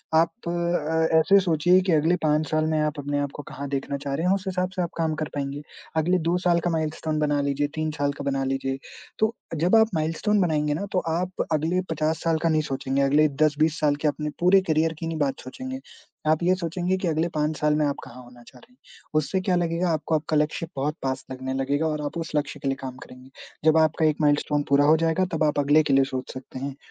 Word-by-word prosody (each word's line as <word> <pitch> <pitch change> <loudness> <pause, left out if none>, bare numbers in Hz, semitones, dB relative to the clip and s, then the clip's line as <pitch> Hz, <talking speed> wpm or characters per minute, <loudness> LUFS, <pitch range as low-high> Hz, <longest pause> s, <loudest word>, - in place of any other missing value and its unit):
आप 165 +1 +4 0.2
अ, 160 -2 +1
ऐसे 195 +5 +5
सोचिए 175 0 +3
कि 185 0 0
अगले 160 +3 +3
5 155 0 +2
साल 155 0 +2
में 155 -1 +1
आप 150 0 0
अपने 145 0 -2
आप 145 -1 -2
को - - -5
कहाँ 140 +1 -6
देखना 140 0 -2
चाह 140 0 -5
रहे 165 - -2
हैं, 185 - +4
उस 195 - -5
हिसाब 185 -1 -1
से 185 - -1
आप 170 - -1
काम 160 -1 0
कर 155 0 -3
पाएँगे, 140 +1 -3 0.4
अगले 175 +4 +3
2 175 +1 +2
साल 175 -1 +2
का 175 - 0
माइलस्टोन 155 -1 -2
बना 145 -1 +1
लीजिए, 140 +1 0
3 155 0 -1
साल 145 0 +1
का 140 - -7
बना 135 -1 0
लीजिए। 135 0 -2 0.4
तो 220 - +4 0.3
अ, - - -1
जब 175 +7 +3
आप 220 0 +5
माइलस्टोन 165 +7 +1
बनाएँगे 150 -4 +1
ना 200 +7 -3
तो 185 - +3 0.2
आप 180 +1 -2
अगले 160 +4 +1
50 155 0 -1
साल 165 -1 +2
का 165 - +3
नहीं 155 -1 +2
सोचेंगे, 135 +1 -1
अगले 145 +3 +4 0.2
10, 150 -1 +3
20 155 +1 +2
साल 145 -1 +2
के - - +3
अपने 150 +1 -1
पूरे 185 +2 +5
करियर 160 +1 +2
की 165 - -4
नहीं 165 -1 -3
बात 135 -2 0
सोचेंगे। 260 - -7 0.5
आप 155 +1 +3
ये 180 +2 +4
सोचेंगे 180 +1 -1
कि 185 - -2
अगले 160 +1 +1
5 150 +1 0
साल 150 0 +2
में 150 0 +2
आप 140 - 0
कहाँ 125 +1 -11
होना 120 0 -16
चाह 125 - -15
रहे 245 - -21
हैं, - - -30 0.4
उससे 155 +5 +1
क्या 185 -1 +1
लगेगा, 175 0 0
आपको 160 0 0
आपका 155 0 0
लक्ष्य 150 +2 0
बहुत 145 +3 -1
पास 130 0 -2
लगने 130 0 -4
लगेगा 140 +4 0
और 150 -1 -2
आप 145 - -4
उस 165 -1 -4
लक्ष्य 145 0 -1
के - - -1
लिए 135 - +1
काम 130 -1 -6
करेंगे। 125 +1 -14 0.4
जब 160 0 +5
आपका 160 0 +3
1 155 -1 +2
माइलस्टोन 145 0 +2
पूरा 140 +1 +4
हो 155 +2 +5
जाएगा, 165 +3 +1
तब 160 - +1
आप 150 -1 +1
अगले 145 +2 +4
के 145 - 0
लिए 135 0 +5
सोच 130 -1 -5
सकते 130 0 -8
हैं, 135 +1 -5
155 Hz, 250 wpm, -25 LUFS, 145-165 Hz, 0.5 s, ऐसे